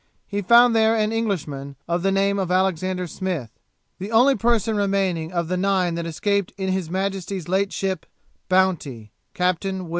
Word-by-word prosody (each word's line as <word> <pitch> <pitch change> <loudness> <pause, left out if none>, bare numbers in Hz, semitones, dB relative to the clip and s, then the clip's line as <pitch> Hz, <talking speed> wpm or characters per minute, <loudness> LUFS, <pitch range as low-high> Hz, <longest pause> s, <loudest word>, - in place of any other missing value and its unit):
he 205 0 -3
found 235 +4 +6
there 220 0 +4
an 215 -1 +1
Englishman 155 -11 -3
of 170 +1 0
the 195 +2 +1
name 200 +1 +1
of 185 -2 -2
Alexander 185 0 0
Smith, 175 - -4 0.5
the 195 +4 -6
only 250 +5 +5
person 225 -1 +1
remaining 195 -5 0
of 170 -2 -1
nine 185 -1 +1
that 170 0 -3
escaped 200 +4 -1
in 190 -1 -2
his 185 -3 -1
Majesty's 190 -1 -3
late 195 +2 +1
ship 190 -4 -3 0.4
Bounty, 155 - 0 0.2
Captain 185 +1 0
W. 185 -3 -7
190 Hz, 160 wpm, -23 LUFS, 175-200 Hz, 0.5 s, found